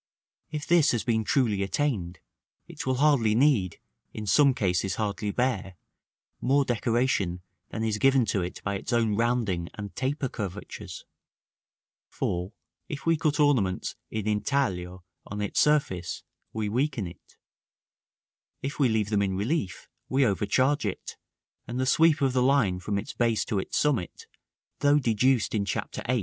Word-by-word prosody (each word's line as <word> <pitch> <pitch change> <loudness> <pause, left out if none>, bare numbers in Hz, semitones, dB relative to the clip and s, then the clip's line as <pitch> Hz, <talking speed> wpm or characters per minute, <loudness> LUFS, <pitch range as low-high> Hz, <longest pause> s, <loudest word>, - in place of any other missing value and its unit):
If 150 -1 -4
this 170 -3 +4
has 120 - 0
been 110 -3 +1
truly 110 -4 +1
attained, 100 - -1 0.5
it - - -7
will 130 - +2
hardly 130 -6 +3
need, 120 - +2 0.4
in 105 - -5
some 135 +7 +4
cases 95 -3 0
hardly 105 -1 -2
bear, 100 -5 -1 0.7
more 140 +2 +3
decoration 115 -7 0 0.3
than 110 - -4
is 110 -1 -1
given 135 -2 +4
to 100 - +1
it 90 +1 -6
by 100 -1 -1
its - - -6
own 115 -3 +2
rounding 110 -7 0
and 100 -2 -7
taper 135 +2 -1
curvatures; 105 -4 -7 1.0
for, 90 +3 -3 0.4
if 145 - -6
we 165 0 +4
cut 155 0 0
ornaments 125 -11 +2
in 110 -1 -3
intaglio 100 -5 -1 0.2
on 100 - -5
its 105 -1 -1
surface, 140 - +1 0.3
we 110 -1 -2
weaken 125 0 -1
it; 85 0 -13 1.3
if 140 +3 -4
we 135 -4 +4
leave 110 -2 0
them 105 -1 +2
in 95 -1 0
relief, 105 - -2 0.2
we 135 +1 +3
overcharge 130 +7 +1
it, 100 -4 -4 0.5
and 120 +2 -4
the 130 - +1
sweep 155 +3 +4
of 135 -2 +2
the 130 - +2
line 125 -9 +3
from 100 +2 -2
its 100 - -5
base 115 -2 +1
to 105 - -1
its - - -3
summit, 125 - 0 0.5
though 145 0 +4
deduced 125 -2 +2
in 105 -2 +1
Chapter 100 - -3
VIII. 125 0 +2
115 Hz, 155 wpm, -27 LUFS, 100-135 Hz, 1.3 s, this